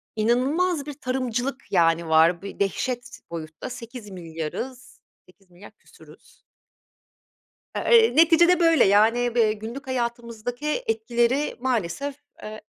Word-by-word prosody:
inanılmaz 280 +9 +1
bir 295 - -6
tarımcılık, 255 -1 -3
yani, 165 -2 +2
var. 165 +2 +4
Bir 200 - -9
dehşet 245 +6 -3
boyutta 160 +6 -7
8.000.000.000'ız, 220 -1 -8 0.3
8.000.000.000 180 0 -17
küsuruz. 470 - -20 1.4
Eee, 455 -1 +4
neticede, 335 +2 +5
böyle, 330 -5 +5
yani, 230 +4 +3
bi 220 -2 +3
günlük 240 +6 -8
hayatımızdaki 245 - -3
etkileri 285 - 0
maalesef, 255 +2 -2 0.3
eee, 215 0 -8
240 Hz, 100 wpm, -24 LUFS, 200-275 Hz, 1.4 s, neticede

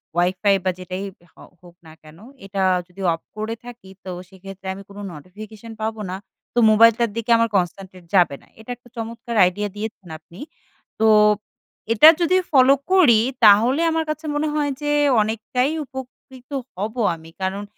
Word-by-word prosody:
Wifi 185 +3 +2
বা 185 - +2
যেটাই 185 +1 -6 0.3
হ - - -58 0.3
হোক 175 -1 -17
না 160 - -13
কেন, 155 +1 -16 0.3
এটা 195 0 -4 0.3
যদি 185 +2 -13
অফ 165 - -7 0.2
করে 215 +1 -3
থাকি 240 -5 -12 0.2
তো - - -6 0.2
সেক্ষেত্রে 195 0 -11
আমি 195 +1 -10
কোনো 200 +1 -10
নোটিফিকেশন 210 +8 -11
পাবো 220 0 -3
না। 185 - -4 0.4
তো 240 - +1
মোবাইলটার 230 +2 +5
দিকে 230 +1 -2
আমার 230 0 +1
concentrate 185 0 -5
যাবে 175 -6 +4
না। - - -23
এটা 220 - -15
একটা 245 0 -22
চমৎকার 230 +1 -6
আইডিয়া 205 +3 -2
দিয়েছেন 210 -2 -7
আপনি। 170 +5 -17 0.6
তো 220 - +3 0.9
এটা 230 +8 +7
যদি 345 +2 +2 0.2
ফলো 265 -2 +6 0.2
করি 320 -13 +6 0.3
তাহলে 230 +8 +5
আমার 320 0 0
কাছে 310 +1 -4
মনে 300 +1 0
হয় 295 -1 0
যে 295 0 -1 0.3
অনেকটাই 225 +5 -1
উপকৃত 260 0 -12 0.3
হব 210 +5 -4 0.2
আমি। 165 0 -15
কারণ 195 +2 -2
215 Hz, 160 wpm, -21 LUFS, 190-245 Hz, 0.9 s, এটা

